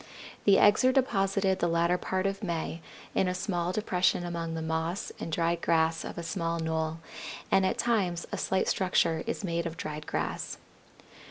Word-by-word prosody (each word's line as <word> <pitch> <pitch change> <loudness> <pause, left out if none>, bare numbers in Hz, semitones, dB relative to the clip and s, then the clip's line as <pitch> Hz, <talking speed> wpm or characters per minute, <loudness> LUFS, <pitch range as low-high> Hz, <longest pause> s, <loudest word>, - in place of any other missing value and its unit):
The 200 -1 +7
eggs 205 +4 +5
are 255 - +6
deposited 195 -7 +2
the 175 - +2
latter 170 +1 +2
part 190 0 -1
of 195 +1 -1
May 170 -3 -3 0.3
in 190 - +2
a 180 - -1
small 180 -2 -1
depression 185 -3 +1
among 165 -1 -3
the 160 - -3
moss 160 +3 -2
and 165 - -5
dried 170 +1 +1
grass 165 0 +2
of - - -7
a 170 - -4
small 165 -1 -2
knoll, 160 0 -2 0.5
and 190 -1 +4
at - - -1
times 190 -8 +1
a - - -2
slight 190 0 +1
structure 170 -4 +2
is 230 - -3
made 170 -2 -1
of 165 0 -7
dried 155 -1 -5
grass. - - -3
175 Hz, 180 wpm, -29 LUFS, 165-190 Hz, 0.5 s, The